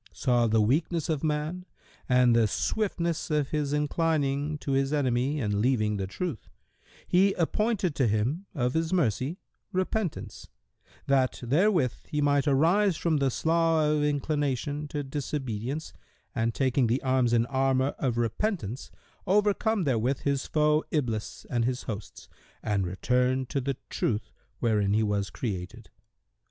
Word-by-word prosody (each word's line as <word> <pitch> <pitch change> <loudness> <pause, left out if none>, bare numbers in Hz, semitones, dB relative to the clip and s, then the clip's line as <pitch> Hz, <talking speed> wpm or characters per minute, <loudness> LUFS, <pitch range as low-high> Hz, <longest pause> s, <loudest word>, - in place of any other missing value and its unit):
saw 120 -3 +2
the 110 0 +3
weakness 155 +8 +1
of 155 -2 -1
man 155 +4 -1 0.5
and 125 -1 +5
the 115 -2 +4
swiftness 170 - -1
of 150 -3 +1
his 150 -2 -1
inclining 150 -1 0
to 145 - -4
his 135 +1 +1
enemy 135 0 +1
and 105 -5 -1
leaving 110 -4 +1
the 95 -1 -3
truth, 160 - -5 0.6
He 195 +2 +4
appointed 200 +1 0
to 130 - +3
him, 120 - -1
of 125 -3 0
His 160 0 0
mercy, 145 - 0 0.3
repentance, 185 0 -3 0.6
that 135 -2 +2
therewith 150 - +2
he 150 - -2
might 145 0 +2
arise 165 +7 +3
from 165 -3 +1
the 140 -1 +2
slough[FN#127] 160 +1 +2
of - - 0
inclination 145 0 -1
to 145 0 -3
disobedience 135 -1 -4 0.4
and 115 0 -1
taking 130 -2 +2
the 120 +4 0
arms 130 -2 +2
and 115 -1 +3
armour 135 0 +1
of 125 -4 0
repentance, 120 - -2 0.4
overcome 210 +2 +2
therewith 130 -1 0
his 140 -1 -1
foe 150 0 +2
Iblis 120 -8 -2
and 120 -1 0
his 125 +1 -1
hosts 105 -4 -7 0.4
and 100 -3 0
return 125 +7 +1
to 140 +2 -2
the 135 0 -2
Truth, 105 -1 -1 0.3
wherein 105 -4 +1
he 110 - +3
was 105 -1 0
created. 105 0 -5
140 Hz, 145 wpm, -28 LUFS, 120-155 Hz, 0.6 s, and